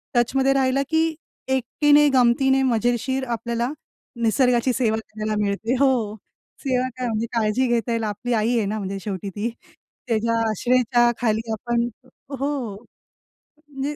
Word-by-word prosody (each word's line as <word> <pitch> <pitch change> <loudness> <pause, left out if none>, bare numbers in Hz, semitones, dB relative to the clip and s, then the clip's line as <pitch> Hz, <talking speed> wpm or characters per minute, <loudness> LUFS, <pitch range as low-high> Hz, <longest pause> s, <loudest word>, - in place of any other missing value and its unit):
टचमध्ये 265 +3 +3
राहिला 270 0 +2
की 320 0 +1 0.3
एकटीने 290 +3 +3
गमतीने 265 +2 +4
मजेशीर 245 +2 0
आपल्याला 235 +3 -2 0.5
निसर्गाची 245 +1 +3
सेवा 220 -3 +1
करायला 215 -1 -4
मिळते 205 +5 -1
हो, 245 -6 +2 0.5
सेवा 255 -1 +1
काय 250 -1 -2
म्हणजे 225 0 -1
काळजी 230 +3 +1
घेता 235 0 0
येईल. 230 -1 0
आपली 215 +4 -2
आई 225 +2 +1
आहे 215 - +1
ना 215 +2 -2
म्हणजे 195 -1 -4
शेवटी 195 -1 -4
ती. 210 +4 -3 0.6
तिच्या 230 +1 +1
आश्रयाखाली 240 0 +2
आपण 235 +2 -1 0.5
हो, 280 +2 0 1.2
म्हणजे 280 +1 -4
240 Hz, 130 wpm, -23 LUFS, 220-260 Hz, 1.2 s, गमतीने